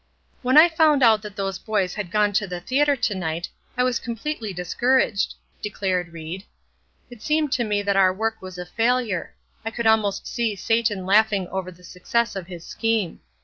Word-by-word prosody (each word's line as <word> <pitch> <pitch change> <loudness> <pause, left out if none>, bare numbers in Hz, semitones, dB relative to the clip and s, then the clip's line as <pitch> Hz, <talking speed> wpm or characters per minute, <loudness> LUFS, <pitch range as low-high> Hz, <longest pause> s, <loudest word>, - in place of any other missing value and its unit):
"When 260 +2 +3
I 315 +3 +10
found 315 -4 +3
out 220 -3 +5
that 210 -2 -9
those 195 -1 -3
boys 200 -4 -1
had 205 -4 -5
gone 210 +2 +2
to 205 0 +1
the 180 -1 -5
theatre 280 +9 +2
to 240 -4 0
night 170 -2 -3 0.3
I 250 - +3
was 250 -1 +1
completely 235 -1 -4
discouraged," 200 +5 +1 0.3
declared 185 -4 -2
Ried. 165 +4 -7 0.7
"It 240 -3 -12
seemed 305 +2 +1
to 245 - +1
me 205 -2 0
that 200 -1 +1
our 190 -1 +5
work 220 +3 -2
was 185 -1 -9
a 180 - -5
failure; 225 -1 0 0.3
I 225 - -2
could 230 +1 -4
almost 220 -3 +2
see 230 -3 -1
Satan 220 -2 0
laughing 205 -1 +3
over 190 -1 -4
the 180 0 -18
success 230 +7 -1
of 185 -3 -5
his 175 -3 -9
scheme. 225 -6 -1
210 Hz, 190 wpm, -23 LUFS, 185-235 Hz, 0.7 s, I